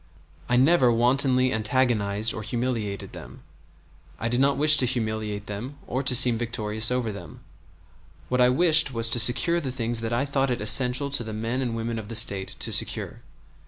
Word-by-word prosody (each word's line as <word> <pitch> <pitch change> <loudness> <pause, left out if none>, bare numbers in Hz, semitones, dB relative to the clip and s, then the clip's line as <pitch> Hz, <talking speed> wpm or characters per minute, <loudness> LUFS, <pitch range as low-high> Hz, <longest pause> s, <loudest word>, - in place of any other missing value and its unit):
I 120 - +1
never 130 -1 +3
wantonly 130 +2 +1
antagonized 110 -2 -1
or 110 - -7
humiliated 115 -3 -5
them. - - -12 0.8
I 115 - -3
did 120 +1 -2
not 140 0 +1
wish 155 +2 +6
to 130 - +4
humiliate 110 -4 -4
them 115 +8 -8
or 130 +3 -4
to 130 -2 +2
seem 125 -2 +7
victorious 110 -2 -1
over 125 -3 -2
them; 90 -6 -12 0.9
what 125 +7 -1
I 125 - +4
wished 160 +1 +4
was 115 -2 0
to 120 - +1
secure 120 +9 +2
the 135 -4 -5
things 120 -2 -2
that 115 0 -5
I 120 +4 -1
thought 135 -1 -2
it 125 - -3
essential 125 +5 +2
to 140 -4 -1
the 110 -1 -8
men 115 +4 -4
and 120 -3 -4
women 115 0 -5
of 105 - -10
the 115 - -8
State 100 -3 0
to - - -3
secure. - - -2
120 Hz, 190 wpm, -24 LUFS, 110-130 Hz, 0.9 s, seem